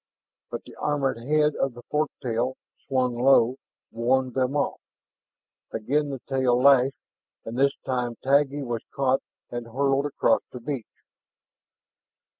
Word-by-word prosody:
But - - -5
the - - -13
armored 140 -5 0
head 150 +4 +2
of 135 -3 -1
the 120 - -11
fork 150 +3 0
tail, 125 +1 -1 0.3
slung 130 -2 +1
low, 125 0 +4 0.3
warned 125 +2 +1
them 130 +2 0
off. 140 - -1 0.9
Again 145 +7 0
the 135 - -3
tail 130 -2 +2
lashed, 135 0 +5 0.5
and 115 - -5
this 140 +2 +3
time 125 -2 -1
Taggi 140 +1 +2
was 120 -3 -3
caught 135 -1 +2 0.3
and 120 -1 -5
hurled 135 +3 +1
across 145 - +2
the 125 - -7
beach. 130 -2 -6
130 Hz, 135 wpm, -26 LUFS, 120-140 Hz, 0.9 s, lashed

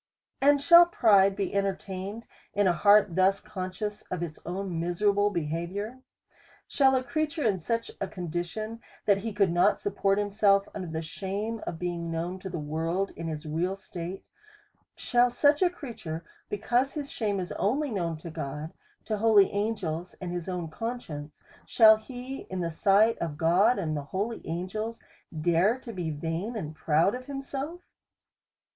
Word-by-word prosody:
And 285 +1 +5
shall 340 +4 +8
pride 200 - +4
be 200 -1 -2
entertained 195 +2 -3 0.3
in 205 0 +3
a 180 - +4
heart 205 -1 +5
thus 190 +1 +3
con 185 -1 -5
scious 210 +3 -5
of 180 -2 -2
its 160 -2 -6
own 180 -1 -3
miserable 200 +4 +2
behaviour? 175 +7 -3 0.7
Shall 265 -2 +4
a 255 - +1
creature 305 +4 -2
in 200 -5 +2
such 230 +7 -2
a 195 - 0
condition, 180 +7 -4 0.3
that 200 -1 +4
he 225 +2 -4
could 200 -3 +2
not 195 +4 +3
support 200 0 +1
himself 200 -1 +3
under 185 -3 -5
the 160 0 -4
shame 200 +7 -4
of 165 - -3
being 170 -1 -3
known 170 +3 -3
to 190 - -6
the 175 - -4
world 165 +5 -2
in 165 - -5
his 155 0 -5
real 170 +5 -1
state; 185 -1 -7 0.7
shall 245 0 +3
such 290 +5 +3
a 365 - +5
creature, 200 - -7 0.2
because 245 +7 0
his 290 -2 -4
shame 205 -4 -1
is 180 - -4
only 275 +7 0
known 170 -6 -2
to 165 +1 -8
God, 150 +2 -5 0.3
to 215 - -1
holy 210 -2 +5
an 210 +3 0
g 200 -4 -7
els, 165 +3 -4
and 180 -2 -5
his 175 0 -4
own 180 -2 -3
conscience; 155 - -6 0.2
shall 220 -2 +7
he, 250 +4 -8
in 185 -1 -3
the 170 -1 -2
sight 200 +7 +4
of 155 -3 -3
God, 185 +9 +4
and 160 -6 -1
holy 195 +11 -3
angels, 200 +7 -4 0.4
dare 175 +8 +3
to 250 -3 -9
be 175 -4 -3
vain 165 +9 -3
and 155 -8 -4
proud 160 +6 +2
of 255 0 -6
himself? 280 +4 -5
195 Hz, 170 wpm, -28 LUFS, 170-225 Hz, 0.7 s, shall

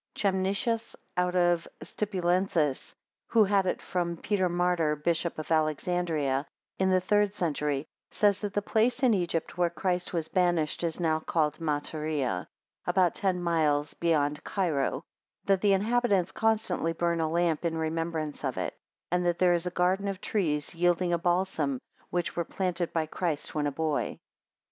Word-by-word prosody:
Chemnitius, 200 +4 0 0.2
out 180 0 +1
of 175 -1 +2 0.2
Stipulensis, 180 -7 0 0.3
who 225 -2 +5
had 195 -1 +2
it - - -1
from 170 -2 -2
Peter 185 0 0
Martyr, 175 -3 +1
Bishop 165 +3 -1
of 155 +1 -6
Alexandria, 155 -3 0 0.3
in 190 0 +3
the 185 0 +4
third 205 +2 +2
century, 150 -5 -1 0.2
says, 205 -2 +2
that 205 -2 -4
the 205 - +1
place 235 +6 +1
in 245 -3 +5
Egypt 175 -2 -2
where 175 -1 +3
Christ 180 0 -1
was 165 -3 -2
banished 175 -4 +1
is 165 0 -2
now 160 -2 +1
called 155 -2 0
Matarea, 150 - -2 0.4
about 180 -3 +3
ten 190 -3 0
miles 150 -4 +1
beyond 150 -3 +1
Cairo; 165 -9 -1 0.4
that 195 -2 +3
the 205 -1 +4
inhabitants 205 -3 +2
constantly 220 -7 +1
burn 170 0 0
a 160 - 0
lamp 170 -1 +1
in 165 -1 -1
remembrance 160 -1 -2
of - - -2
it; - - -2 0.4
and 180 0 +2
that 175 -1 +1
there 180 -1 +4
is 175 +1 0
a - - +1
garden 185 +3 +1
of 195 -2 -3
trees 155 -10 -1
yielding 175 +1 +2
a 170 - +1
balsam, 175 -6 0 0.3
which 175 -1 -2
were 170 - 0
planted 180 -1 -2
by 160 -1 0
Christ 160 -1 -3
when 150 -1 0
a - - -1
boy. 155 0 -1
175 Hz, 160 wpm, -29 LUFS, 160-190 Hz, 0.4 s, who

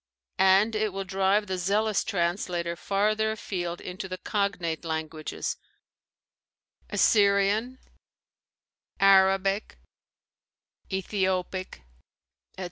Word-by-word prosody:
and 190 +4 +5
it 215 -1 0
will 195 +1 -4
drive 195 +2 +1
the 185 -2 -3
zealous 205 +3 +1
translator 170 -1 -1
farther 215 +5 0
afield 175 -5 -4
into 185 +1 -7
the 185 - -4
cognate 185 -4 -2
languages, 160 -1 -4 1.3
Assyrian, 205 +4 +3 1.2
Arabic, 195 +1 +3 1.1
Ethiopic, 185 - -2 0.7
etc. - - -10
195 Hz, 80 wpm, -27 LUFS, 180-205 Hz, 1.3 s, and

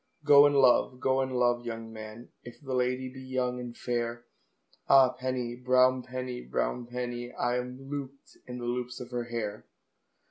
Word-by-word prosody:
"Go 145 -1 +8
and 145 - +1
love, 125 -1 +4
go 130 +1 +2
and 130 -1 -2
love, 120 -1 +2
young 115 -1 -6
man, 110 +2 -9
If 120 - -11
the 135 -3 -6
lady 125 +1 0
be 130 +1 -10
young 130 -1 -2
and 120 -1 -7
fair," 120 -1 -3 0.6
Ah, 135 -2 +7
penny, 125 -2 -3
brown 130 +1 +3
penny, 125 0 -5
brown 65 - -2
penny, 120 0 -4
I 120 0 -1
am 125 +1 -5
looped 135 0 -8
in 125 0 -6
the 120 - -5
loops 125 +1 -3
of 125 0 -9
her 120 -1 -2
hair. 110 -3 -5
125 Hz, 175 wpm, -29 LUFS, 120-130 Hz, 0.6 s, Go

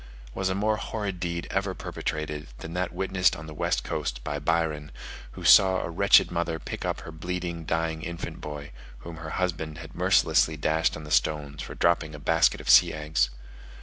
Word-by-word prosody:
Was 95 0 -1
a 95 - -1
more 105 +2 +1
horrid 105 -5 -4
deed 85 -1 -3
ever 95 -1 -1
perpetrated, 75 -1 -4
than 80 - -8
that 90 0 -1
witnessed 95 -2 +1
on 80 - -8
the 80 - -9
west - - -1
coast - - -3
by 75 - -3
Byron, 75 -1 -1 0.4
who - - -9
saw 95 -1 +7
a - - -4
wretched 100 +3 +5
mother 85 -1 -1
pick - - -6
up - - -2
her 80 - -9
bleeding 85 0 -4
dying 80 0 -1
infant 85 +1 -6
boy, 75 -1 -7 0.3
whom 85 -1 -7
her 80 -1 -7
husband 80 -4 -2
had 80 0 -10
mercilessly 80 -1 +3
dashed 80 +3 +1
on 80 - -9
the 75 - -9
stones 75 -2 0
for - - -7
dropping 85 -2 +1
a - - -9
basket 80 -2 +3
of - - -10
sea - - +7
eggs! 75 -5 0
80 Hz, 190 wpm, -27 LUFS, 75-90 Hz, 0.4 s, saw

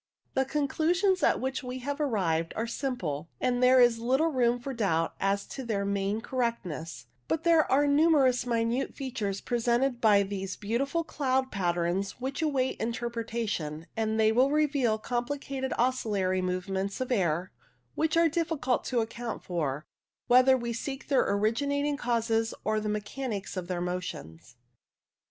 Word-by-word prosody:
The 265 - +2
conclusions 330 +7 +1
at - - +3
which 265 +2 -2
we 250 -1 -5
have 285 +4 -4
arrived 170 - 0
are 225 - -1
simple, 180 - -3
and 250 -1 0
there 255 +1 +6
is 240 -2 +5
little 265 +8 +2
room 245 -4 +2
for 265 +3 -6
doubt 165 -8 0
as 200 +1 0
to 270 - -6
their 205 -4 -1
main 200 +2 -1
correctness, 175 - -3 0.2
but 325 - -1
there 330 -2 +4
are 280 +2 +4
numerous 285 -4 +4
minute 235 +2 0
features 215 -8 -3
presented 240 +1 0
by 205 -3 +5
these 195 -1 -4
beautiful 275 +10 -1
cloud 265 -4 -1
patterns 175 +2 -1
which 270 +4 -3
await 275 -5 0
interpretation, 225 -9 -3
and 220 0 0
they 220 0 +5
reveal 270 -2 +2
compli 245 +5 -2
cated 265 -1 -4
oscillatory 205 -7 +1
movements 190 +2 -2
in 255 - -1
the 250 - +1
air 175 -1 0 0.4
which 320 +1 0
are 335 0 +5
difficult 315 -6 0
to 245 -3 +1
account 230 +1 -5
for, 155 -4 -2 0.4
whether 255 +1 +6
we 235 -1 -3
seek 270 +4 -5
their 275 - +3
origi 215 +7 +1
nating 285 +1 0
causes 225 -2 0
or 215 0 +1
the 210 0 -3
mechanics 210 0 -4
of 180 -2 -4
their 175 -1 -2
motions. 125 - -5
235 Hz, 155 wpm, -29 LUFS, 200-265 Hz, 0.4 s, there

